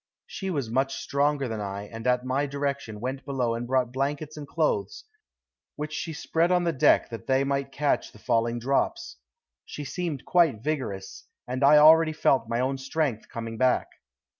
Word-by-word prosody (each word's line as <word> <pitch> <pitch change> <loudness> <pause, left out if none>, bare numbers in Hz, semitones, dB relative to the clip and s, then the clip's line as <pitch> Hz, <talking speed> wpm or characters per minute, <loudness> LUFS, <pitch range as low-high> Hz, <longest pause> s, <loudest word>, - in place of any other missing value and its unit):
She 190 - -5
was 140 -10 -2
much 135 +2 0
stronger 140 -1 0
than 110 -2 -4
I, 100 0 -4
and 115 +3 -7
at 125 0 +2
my 135 +3 0
direction 140 -6 -3
went 130 +4 -4
below 130 -4 -1
and 120 +1 -4
brought 125 -1 +1
blankets 145 +3 -2
and 150 -2 -8
clothes, 120 - -1 0.7
which 150 +1 -5
she 160 - -3
spread 165 +2 0
on 180 -1 +3
the 170 -1 0
deck 130 - +3
that 115 - -8
they 130 0 +3
might 140 0 -1
catch 140 +1 0
the - - -16
falling 115 +2 0
drops. 230 - -1 0.5
She 150 - -7
seemed 165 -3 -4
quite 160 -11 +3
vigorous, 125 -11 -4 0.2
and 130 +2 -2
already 155 +3 +7
I - - -17
felt 130 -7 +2
my 115 - 0
own 135 +1 -1
strength 135 -3 -2
coming 115 -1 -6
back. 130 -1 +2
135 Hz, 180 wpm, -26 LUFS, 120-150 Hz, 0.7 s, already